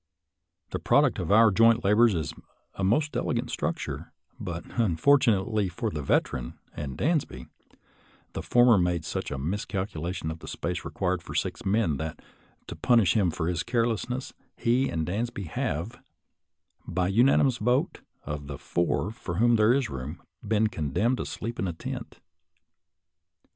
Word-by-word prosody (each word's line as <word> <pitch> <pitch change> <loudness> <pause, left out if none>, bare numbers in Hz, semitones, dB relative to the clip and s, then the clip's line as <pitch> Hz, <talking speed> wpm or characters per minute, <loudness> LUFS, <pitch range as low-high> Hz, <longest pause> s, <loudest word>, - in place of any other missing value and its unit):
The - - -2
product - - +3
of - - -2
our 110 +1 +7
joint 115 +3 +4
labors 105 +2 +4
is 80 -4 -2 0.4
a 95 - -5
most 145 +11 +1
elegant - - -1
structure; - - -3 0.3
but, - - -5 0.2
unfortunately 110 - +3
for 105 +5 -3
the 75 - -4
Veteran 65 -3 0 0.2
and 70 -3 -5
Dansby, 145 - -1 0.9
the - - -4
former 120 -3 +5
made 85 -2 0
such - - -3
a 70 - -4
miscalculation 90 0 -3
of 80 - -7
the - - -11
space 90 +1 -3
required 95 -2 -2
for - - -9
six - - -2
men 95 -7 +1
that, 80 +2 -5 0.5
to - - -7
punish 115 -8 +3
him 100 -5 +3
for 80 0 -2
his 85 -1 0
carelessness, 120 +2 -1 0.2
he 125 +3 +2
and 80 -1 -2
Dansby 105 +3 -3
have, 95 +14 -3 0.9
by 90 +1 0
unanimous 125 +4 +4
vote 125 +5 0 0.2
of 75 -1 -5
the 70 -1 -6
four 85 +7 -1
for 85 -6 -6
whom 120 +5 +4
there 110 +1 +4
is 135 -1 +2
room, 70 +4 -6 0.2
been 110 0 +1
condemned 110 - 0
to - - -4
sleep 115 +2 -5
in 95 - 0
a 85 - -3
tent. - - -7
100 Hz, 155 wpm, -27 LUFS, 85-115 Hz, 0.9 s, our